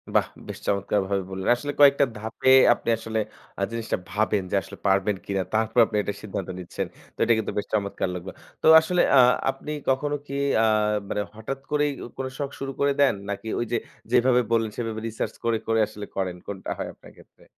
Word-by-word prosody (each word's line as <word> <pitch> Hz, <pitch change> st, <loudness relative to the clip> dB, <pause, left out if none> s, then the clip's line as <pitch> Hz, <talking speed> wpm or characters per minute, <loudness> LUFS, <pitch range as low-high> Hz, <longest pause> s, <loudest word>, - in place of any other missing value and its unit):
বাহ! -, -, +4 dB, 0.2 s
বেশ -, -, -7 dB
চমৎকারভাবে 100 Hz, -1 st, 0 dB
বললেন। 95 Hz, 0 st, -3 dB
আসলে 145 Hz, +4 st, -4 dB
কয়েকটা 140 Hz, 0 st, +7 dB
ধাপে 110 Hz, +4 st, -1 dB, 0.2 s
আপনি 115 Hz, -, -5 dB
আসলে 110 Hz, 0 st, -3 dB, 0.4 s
আ -, -, -3 dB
জিনিসটা 115 Hz, -1 st, -2 dB
ভাবেন 105 Hz, -1 st, +1 dB
যে -, -, +1 dB
আসলে -, -, -11 dB
পারবেন 95 Hz, +1 st, +2 dB
কিনা 100 Hz, -1 st, -1 dB
তারপরে 110 Hz, +2 st, +3 dB
আপনি 110 Hz, -, -3 dB
এটা 105 Hz, -, -3 dB
সিদ্ধান্ত 95 Hz, -2 st, -5 dB
নিচ্ছেন 90 Hz, -, -4 dB, 0.3 s
তো -, -, -51 dB
এটা 115 Hz, -, +4 dB
কিন্তু 110 Hz, -, -2 dB
বেশ 105 Hz, -, -1 dB
চমৎকার 100 Hz, -3 st, -1 dB
লাগল। 90 Hz, +1 st, -6 dB, 0.3 s
তো -, -, -3 dB
আসলে 175 Hz, +2 st, +1 dB, 0.2 s
আ -, -, +9 dB, 0.3 s
আপনি 135 Hz, +3 st, -4 dB, 0.2 s
কখনো 145 Hz, +3 st, +1 dB
কী 140 Hz, -, -7 dB, 0.3 s
আ -, -, +5 dB, 0.4 s
মানে 105 Hz, -, -1 dB
হঠাৎ 125 Hz, +5 st, -5 dB
করেই 150 Hz, 0 st, +2 dB, 0.3 s
কোনো 130 Hz, 0 st, -3 dB
শখ 140 Hz, -2 st, -2 dB
শুরু 135 Hz, 0 st, -3 dB
করে 140 Hz, 0 st, +3 dB
দেন 140 Hz, -, +5 dB, 0.2 s
নাকি 100 Hz, +2 st, -4 dB
ওই 120 Hz, -, 0 dB
যে 120 Hz, -, +2 dB, 0.3 s
যেভাবে 125 Hz, 0 st, +4 dB
বললেন, 115 Hz, -2 st, +2 dB
সেভাবে 115 Hz, -2 st, -3 dB
রিসার্চ 110 Hz, -1 st, -3 dB
করে, 115 Hz, -1 st, +2 dB
করে 115 Hz, 0 st, +2 dB
আসলে 105 Hz, 0 st, -8 dB
করেন? 95 Hz, -2 st, -2 dB
কোনটা 100 Hz, -2 st, -6 dB
হয় -, -, -3 dB
আপনার -, -, -16 dB
ক্ষেত্রে? -, -, -20 dB
110 Hz, 195 wpm, -25 LUFS, 100-130 Hz, 0.4 s, আ